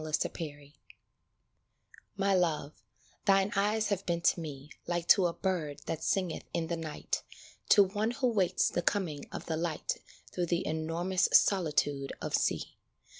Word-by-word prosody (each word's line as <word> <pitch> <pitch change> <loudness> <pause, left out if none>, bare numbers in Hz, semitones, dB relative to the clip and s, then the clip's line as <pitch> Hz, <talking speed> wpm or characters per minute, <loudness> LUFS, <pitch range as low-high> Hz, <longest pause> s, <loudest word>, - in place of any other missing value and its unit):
65 155 -1 0
SONG 145 -3 -7 1.4
MY 200 0 +2
Love, 155 -5 +1 0.5
thine 195 0 +4
eyes 210 +2 +1
have 200 -2 -1
been 170 -1 0
to 170 - +3
me 150 -2 -7 0.2
Like 175 -1 -1
to 190 -3 +7
a 170 - -3
bird 165 -8 -2
that 160 -1 -3
singeth 185 -4 0
in 170 - 0
the 170 - 0
night 160 -2 -3 0.5
To 205 - +8
one 205 +3 -1
who 255 +1 0
waits 190 -5 +2
the 175 - -1
coming 170 -6 -1
of - - -6
the 160 - -2
light 165 -1 -2 0.3
Through 175 -1 -1
the 170 +2 0
enormous 165 +4 0
solitude 150 -7 +3
of - - -5
sea. - - 0
170 Hz, 155 wpm, -31 LUFS, 155-195 Hz, 1.4 s, To